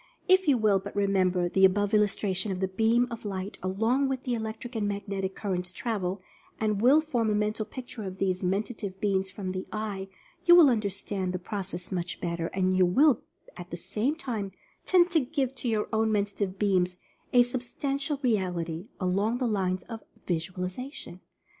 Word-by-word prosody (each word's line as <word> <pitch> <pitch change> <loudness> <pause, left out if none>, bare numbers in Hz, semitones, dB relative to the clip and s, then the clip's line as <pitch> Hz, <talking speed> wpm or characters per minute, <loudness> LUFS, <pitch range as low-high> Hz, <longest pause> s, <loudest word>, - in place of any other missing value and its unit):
If 375 -1 +5
you 275 -3 +5
will 210 -3 +3
but 200 +2 -9
remember 190 -3 +2
the 190 +2 +1
above 205 +2 +4
illustration 205 -1 +1
of 185 - -3
the 190 - +1
"beam 225 +5 +2
of 230 - -6
light" 195 -1 -5
along 225 +9 +1
which 260 -1 -2
the 250 - -1
electric 225 +2 -5
and 210 -2 0
magnetic 200 -2 -3
currents 180 -3 -2
travel, 190 -3 -3 0.4
and 215 -2 0
will 270 +6 +6
form 245 -8 0
a 210 - +2
Mental 215 +1 -1
Picture 245 -2 -7
of 190 0 -6
these 185 -1 0
Men 190 +3 +1
tative 205 -5 -7
Beams 195 -2 +1
from 185 -1 -5
the 185 0 -5
Eye, 210 -3 -4 0.4
you 345 - +8
will 320 -6 +8
understand 200 -3 -2
the - - -1
process 185 -1 -4
much 180 -1 -3
better, 170 -1 -2
and 185 0 0
you 185 - +5
will 250 - +4 0.3
at 175 -1 -9
the 170 - -5
same 215 - 0
time 220 - -4 0.3
tend 360 -1 +4
to 330 - +4
give 270 -1 -1
to 250 - -1
your 215 -2 0
own 220 0 +2
Mentative 200 -2 -1
beams 185 -3 +1 0.3
a 245 -1 +7
substan 255 +3 -3
tial 280 0 -3
reality, 180 -6 -1
along 200 +5 +1
the 255 - -1
lines 185 -5 0
of 225 -2 -8 0.2
Visualization. 180 - -4
205 Hz, 185 wpm, -28 LUFS, 185-235 Hz, 0.4 s, you